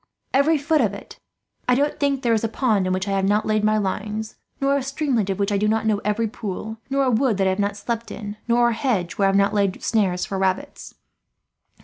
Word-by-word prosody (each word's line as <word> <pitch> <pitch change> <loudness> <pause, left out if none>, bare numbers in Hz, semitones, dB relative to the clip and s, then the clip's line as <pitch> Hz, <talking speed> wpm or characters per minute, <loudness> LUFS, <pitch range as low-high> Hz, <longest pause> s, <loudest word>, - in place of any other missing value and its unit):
"Every 295 +4 +4
foot 295 +1 +2
of 205 -4 0
it. 200 - -12 0.5
I 250 - +5
don't 290 +3 0
think 280 -1 +2
that 265 - -10
there 235 -2 +3
is 220 - +1
a - - +2
pond 215 -6 +1
in - - 0
which 185 +2 -1
I - - -1
have 195 0 +1
not 210 +2 +2
laid 215 -1 +1
my 215 0 +3
lines, 210 +2 -3 0.2
not 275 0 +2
a 280 - +1
streamlet 265 -6 -1
of 190 - -1
which 200 0 0
I 200 - +1
do 210 - +1
not 220 +1 +1
know 210 -2 +1
every 210 +2 0
pool, 220 0 -6
not 275 0 +1
a 255 - +2
wood 235 -2 +2
that 195 - +1
I 190 - +3
have 190 - -3
not 200 0 0
slept 230 +2 -4
in, 205 -1 -7
nor 240 0 +4
a - - 0
hedge 225 -8 -1
where 195 - +4
I - - +4
have 195 - +1
not 200 0 +3
laid 200 -2 0
snares 190 -5 +1
for 195 - -4
rabbits. 190 0 -2
215 Hz, 260 wpm, -22 LUFS, 200-245 Hz, 0.5 s, I